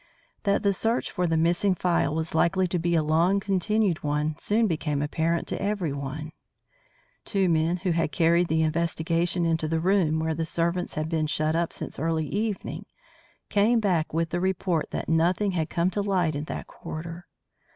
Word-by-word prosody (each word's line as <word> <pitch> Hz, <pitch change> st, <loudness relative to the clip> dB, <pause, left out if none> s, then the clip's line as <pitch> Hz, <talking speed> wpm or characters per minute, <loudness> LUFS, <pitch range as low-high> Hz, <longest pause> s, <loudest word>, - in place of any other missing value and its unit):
That 200 Hz, +1 st, +2 dB
the 200 Hz, -1 st, +3 dB
search 225 Hz, +5 st, 0 dB
for 180 Hz, -1 st, 0 dB
the 165 Hz, -1 st, +1 dB
missing 175 Hz, +4 st, +2 dB
phial 170 Hz, -3 st, +1 dB
was 160 Hz, 0 st, -3 dB
likely 185 Hz, +3 st, +2 dB
to 180 Hz, 0 st, -1 dB
be 170 Hz, +1 st, +1 dB
a 160 Hz, -, +3 dB
long 165 Hz, +6 st, +3 dB
continued 195 Hz, -1 st, 0 dB
one 150 Hz, +1 st, -1 dB
soon 220 Hz, +2 st, +2 dB
became 150 Hz, -6 st, -1 dB
apparent 160 Hz, +3 st, -1 dB
to -, -, -3 dB
everyone. 155 Hz, -7 st, -3 dB, 0.9 s
Two 195 Hz, -3 st, +1 dB
men 165 Hz, +1 st, +2 dB
who 185 Hz, 0 st, -1 dB
had 165 Hz, -2 st, 0 dB
carried 170 Hz, +4 st, +3 dB
the 160 Hz, 0 st, +2 dB
investigation 170 Hz, +2 st, 0 dB
into 160 Hz, -1 st, 0 dB
the 160 Hz, +1 st, 0 dB
room 175 Hz, -3 st, +2 dB
where 160 Hz, 0 st, 0 dB
the 165 Hz, +1 st, -2 dB
servants 170 Hz, +2 st, -1 dB
had 155 Hz, 0 st, -2 dB
been 160 Hz, -1 st, 0 dB
shut 155 Hz, +1 st, 0 dB
up 170 Hz, 0 st, 0 dB
since -, -, -6 dB
early 160 Hz, +1 st, 0 dB
evening, 210 Hz, +3 st, -3 dB, 0.6 s
came 220 Hz, +4 st, +3 dB
back 180 Hz, -7 st, +1 dB
with 165 Hz, +1 st, -1 dB
the 175 Hz, -, 0 dB
report 185 Hz, -3 st, 0 dB
that -, -, -4 dB
nothing 175 Hz, +5 st, +2 dB
had 165 Hz, -3 st, -1 dB
come 175 Hz, +2 st, +1 dB
to 205 Hz, -, -1 dB
light 185 Hz, -5 st, +1 dB
in 145 Hz, +1 st, -4 dB
that -, -, -5 dB
quarter. 165 Hz, +2 st, -8 dB
170 Hz, 180 wpm, -26 LUFS, 160-185 Hz, 0.9 s, the